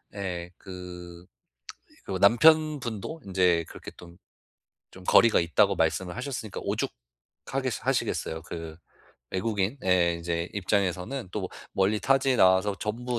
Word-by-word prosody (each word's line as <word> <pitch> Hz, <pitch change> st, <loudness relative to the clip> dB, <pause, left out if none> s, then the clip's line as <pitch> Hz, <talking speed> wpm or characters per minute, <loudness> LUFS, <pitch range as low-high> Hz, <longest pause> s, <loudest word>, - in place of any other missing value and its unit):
예 90 Hz, -3 st, -4 dB
그 90 Hz, -2 st, -10 dB, 0.8 s
그리고 95 Hz, -1 st, -3 dB
남편분도 150 Hz, -, +3 dB
인제 90 Hz, -3 st, +2 dB
그렇게 -, -, -10 dB
좀 85 Hz, 0 st, -14 dB, 0.7 s
좀 95 Hz, -, -13 dB
거리가 115 Hz, +4 st, +5 dB
있다고 100 Hz, +4 st, +3 dB
말씀을 90 Hz, +3 st, 0 dB
하셨으니까 125 Hz, -4 st, -5 dB
오죽하겠 -, -, -5 dB
하시겠어요. 80 Hz, 0 st, -1 dB
그 80 Hz, -2 st, -7 dB, 0.5 s
외국인의 95 Hz, -3 st, +1 dB
인제 85 Hz, 0 st, -3 dB
입장에서는 100 Hz, +4 st, -1 dB
또 105 Hz, -, -2 dB
뭐 95 Hz, -, -4 dB, 0.2 s
멀리 100 Hz, +3 st, +2 dB
타지에 135 Hz, -1 st, +2 dB
나와서 95 Hz, +1 st, +4 dB
전부 120 Hz, +3 st, -2 dB
95 Hz, 285 characters per minute, -27 LUFS, 85-115 Hz, 0.8 s, 거리가